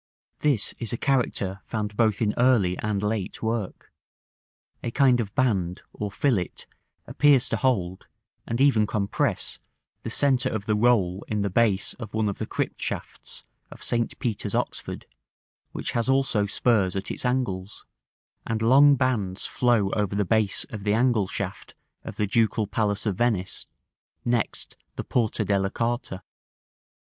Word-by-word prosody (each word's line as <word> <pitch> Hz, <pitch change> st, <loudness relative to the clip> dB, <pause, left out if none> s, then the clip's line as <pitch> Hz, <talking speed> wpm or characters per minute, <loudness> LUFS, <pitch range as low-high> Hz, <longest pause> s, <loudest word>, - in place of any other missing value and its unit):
This 140 Hz, -9 st, +1 dB
is 115 Hz, -, -2 dB
a 120 Hz, -, -2 dB
character 115 Hz, -8 st, 0 dB
found 105 Hz, -2 st, -4 dB
both 110 Hz, -1 st, +2 dB
in 105 Hz, -1 st, +1 dB
early 120 Hz, -8 st, +3 dB
and 105 Hz, -1 st, -1 dB
late 105 Hz, -1 st, -2 dB
work; 110 Hz, -3 st, -3 dB, 0.9 s
a -, -, -3 dB
kind 130 Hz, 0 st, +4 dB
of 105 Hz, -4 st, -4 dB
band, 95 Hz, -8 st, 0 dB
or 105 Hz, -, -4 dB
fillet, 95 Hz, -3 st, -1 dB, 0.4 s
appears 145 Hz, -4 st, +4 dB
to 115 Hz, -, 0 dB
hold, 95 Hz, -7 st, -1 dB, 0.4 s
and 115 Hz, -, -2 dB
even 130 Hz, -6 st, +4 dB
compress, 100 Hz, -2 st, -1 dB, 0.4 s
the -, -, -5 dB
centre 135 Hz, -4 st, +2 dB
of 105 Hz, -2 st, -4 dB
the 110 Hz, -, +1 dB
roll 105 Hz, -5 st, +2 dB
in 105 Hz, -2 st, -1 dB
the 100 Hz, -, -1 dB
base 105 Hz, -2 st, +2 dB
of 110 Hz, -3 st, -7 dB
one 110 Hz, -1 st, +1 dB
of 100 Hz, -, -5 dB
the -, -, -3 dB
crypt -, -, -3 dB
shafts -, -, -5 dB, 0.3 s
of -, -, -10 dB
St. 120 Hz, -1 st, 0 dB
Peter's, 115 Hz, -4 st, -2 dB
Oxford, -, -, -3 dB, 0.7 s
which -, -, -4 dB
has 120 Hz, +1 st, 0 dB
also 135 Hz, -6 st, +2 dB
spurs 100 Hz, -4 st, +1 dB
at 95 Hz, 0 st, -3 dB
its -, -, -5 dB
angles; 110 Hz, -7 st, -2 dB, 0.6 s
and 110 Hz, 0 st, -2 dB
long 140 Hz, +4 st, +7 dB
bands 110 Hz, -8 st, -1 dB
flow 115 Hz, -6 st, +2 dB
over 105 Hz, -2 st, -1 dB
the 100 Hz, 0 st, +1 dB
base 110 Hz, +1 st, +1 dB
of 105 Hz, -3 st, -6 dB
the 105 Hz, 0 st, +2 dB
angle 115 Hz, -4 st, +2 dB
shaft 100 Hz, 0 st, -6 dB, 0.3 s
of -, -, -7 dB
the 105 Hz, -, 0 dB
Ducal 110 Hz, +1 st, +1 dB
Palace 105 Hz, 0 st, -1 dB
of 100 Hz, -4 st, -1 dB
Venice, 110 Hz, -6 st, -1 dB, 0.6 s
next 120 Hz, -2 st, -1 dB, 0.2 s
the -, -, -4 dB
Porta 115 Hz, -4 st, 0 dB
della 100 Hz, -1 st, +1 dB
Carta. 115 Hz, -4 st, -3 dB
110 Hz, 155 wpm, -25 LUFS, 100-120 Hz, 0.9 s, long